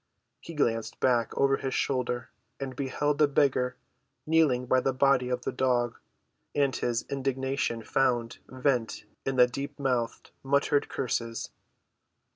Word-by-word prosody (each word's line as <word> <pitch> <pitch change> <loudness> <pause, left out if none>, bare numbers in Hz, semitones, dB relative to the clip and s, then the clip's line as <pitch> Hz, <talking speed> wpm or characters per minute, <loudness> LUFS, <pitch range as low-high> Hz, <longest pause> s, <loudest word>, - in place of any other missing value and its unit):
He 165 - -10
glanced 115 -6 0
back 120 -3 +2
over 135 0 +3
his 135 - -3
shoulder 125 -2 -1 0.3
and 135 -2 -5
beheld 145 +2 -1
the 150 - +6
beggar 130 -3 +2 0.5
kneeling 155 -6 +3
by 130 +1 +3
the 135 +1 0
body 130 -1 +3
of 125 0 -2
the - - -2
dog. 120 -2 0 0.6
And 140 -2 +2
his 120 -1 -1
indignation 135 -3 -1
found 120 -3 0
vent 125 -5 -1 0.2
in 135 - 0
deep‐ 135 +3 +2
mouthed, 125 -4 -2
muttered 140 +1 +1
curses. 115 -2 -3
130 Hz, 130 wpm, -28 LUFS, 125-140 Hz, 0.6 s, the